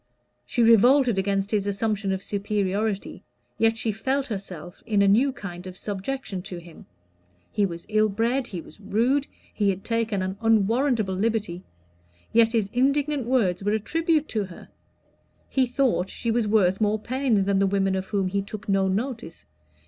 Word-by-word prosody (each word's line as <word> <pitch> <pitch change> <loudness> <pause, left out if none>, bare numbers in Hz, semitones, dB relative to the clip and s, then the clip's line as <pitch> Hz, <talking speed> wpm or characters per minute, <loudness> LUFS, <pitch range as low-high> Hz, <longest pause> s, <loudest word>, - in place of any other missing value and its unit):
She 240 - +1
revolted 235 0 +5
against 195 +1 -1
his 205 -2 0
assumption 205 0 -1
of 190 0 -2
superiority, 205 0 -2 0.4
yet 225 0 +3
she 225 -1 -1
felt 265 +6 -1
herself 185 -5 -7
in 205 -2 +3
a - - +4
new 240 +8 +4
kind 185 -7 -8
of 185 0 -9
subjection 205 0 -4
to 180 -1 -8
him. 170 -1 -13 0.6
He 205 -1 +1
was 170 -2 -8
ill 215 0 +2
bred, 235 +5 0
he 180 -6 -6
was - - -16
rude, 235 +8 +1 0.3
he 205 -2 +1
had 195 0 -2
taken 225 -4 -1
an 190 +1 -4
unwarrantable 225 0 +2
liberty; 200 -3 -1 0.7
yet 230 0 +4
his 220 -4 +1
indignant 275 +1 +1
words 205 -8 +1
were 205 +1 +1
a 220 - +1
tribute 320 +5 0
to 215 -3 -1
her: 180 -2 -13 0.8
he 260 -2 +1
thought 245 -7 +1
she 230 - -2
was 230 -1 +1
worth 195 -2 +2
more 210 0 +2
pains 240 -2 0
than 195 0 +1
the 195 - +3
women 195 0 +1
of 190 0 -2
whom 200 -2 0
he 200 +2 -1
took 210 +1 -8
no 195 -1 +2
notice. 220 -3 -3
210 Hz, 170 wpm, -25 LUFS, 195-235 Hz, 0.8 s, revolted